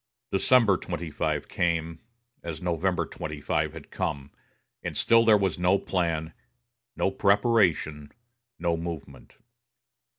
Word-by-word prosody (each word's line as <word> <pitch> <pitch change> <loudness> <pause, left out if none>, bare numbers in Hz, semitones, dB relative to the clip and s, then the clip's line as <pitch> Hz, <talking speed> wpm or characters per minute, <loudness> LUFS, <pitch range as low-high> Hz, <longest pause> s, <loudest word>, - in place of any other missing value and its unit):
December 105 -1 +4
25 85 -4 -3
came, 85 -1 -1 0.4
as 80 -3 -6
November 90 +1 0
25 75 -1 -3
had - - -11
come, 70 0 -3 0.5
and - - -4
still 115 0 +5
there 110 -2 +6
was 95 -3 -1
no 90 +2 +4
plan, 85 -4 -2 0.6
no 95 - +1
preparation, 100 -8 +2 0.5
no 85 -1 0
movement. 80 -6 -7
85 Hz, 105 wpm, -27 LUFS, 80-95 Hz, 0.6 s, there